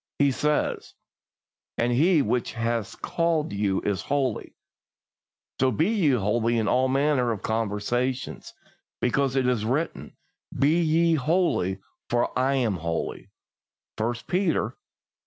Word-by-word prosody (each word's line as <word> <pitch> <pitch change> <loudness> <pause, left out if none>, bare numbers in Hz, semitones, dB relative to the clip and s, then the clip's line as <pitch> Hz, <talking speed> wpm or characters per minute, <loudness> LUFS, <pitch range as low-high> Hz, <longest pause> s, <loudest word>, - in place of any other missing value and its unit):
He 140 -1 +3
says: 150 +3 -1 0.8
"As 120 +1 +1
He 155 +5 +4
which 120 +3 -1
hath 115 -2 -2
called 165 -7 0
you 100 -1 0
is 100 -4 -1
holy, 135 -6 -2 1.0
so 130 - +3
be 155 - +1
ye 200 -9 +2
holy 115 +1 +1
in 110 -2 0
all 130 +4 +3
manner 135 -2 +2
of 110 - -5
conversation; 115 +4 -1 0.6
because 135 +2 +1
it 130 -1 +2
is 125 -4 +1
written, 135 +9 -2 0.4
Be 150 +6 +3
ye 165 +1 +3
holy, 155 - +1 0.3
for 120 0 +1
I 135 +2 +2
am 115 -8 0
holy" 85 0 -4 0.7
(1 115 +2 0
Peter 180 -2 +1
i. - - -15
125 Hz, 130 wpm, -25 LUFS, 115-150 Hz, 1.0 s, He